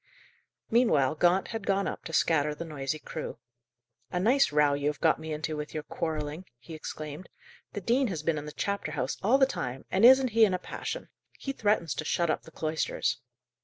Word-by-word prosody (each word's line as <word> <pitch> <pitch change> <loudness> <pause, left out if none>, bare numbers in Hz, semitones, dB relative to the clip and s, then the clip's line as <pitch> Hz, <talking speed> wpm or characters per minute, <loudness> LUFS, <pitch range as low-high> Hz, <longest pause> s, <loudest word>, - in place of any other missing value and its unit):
Meanwhile 190 - +4
Gaunt 175 +4 +2
had 225 -3 -5
gone 195 0 +2
up - - -5
to 165 - -6
scatter 150 -2 +2
the 170 - -6
noisy 145 -2 -3
crew. 155 -2 -6 0.7
"A 180 - -1
nice 250 - +4
row 150 -1 +4
you 140 0 -1
have 150 -1 -1
got 160 -1 +3
me 160 0 -6
into 155 +1 -3
with 150 +1 -6
your 155 - -3
quarrelling," 155 +1 -4
he 125 +7 -12
exclaimed. 155 +1 -7 0.4
"The 205 - -4
dean 245 +7 +2
has 165 -7 -4
been 155 -1 +1
in 145 - -8
the 150 - -6
chapter 200 -3 -3
house 140 -2 -2
all 230 +7 +4
the 270 - +6
time, 130 - -5
and 190 - +1
isn't 260 +1 +8
he 225 0 +4
in 195 -4 +4
a - - 0
passion! - - -6 0.3
He 275 - -4
threatens 205 - +1
to - - -4
shut 170 +1 +1
up - - -2
the - - -14
cloisters." 155 -5 -1
160 Hz, 205 wpm, -29 LUFS, 150-200 Hz, 0.7 s, isn't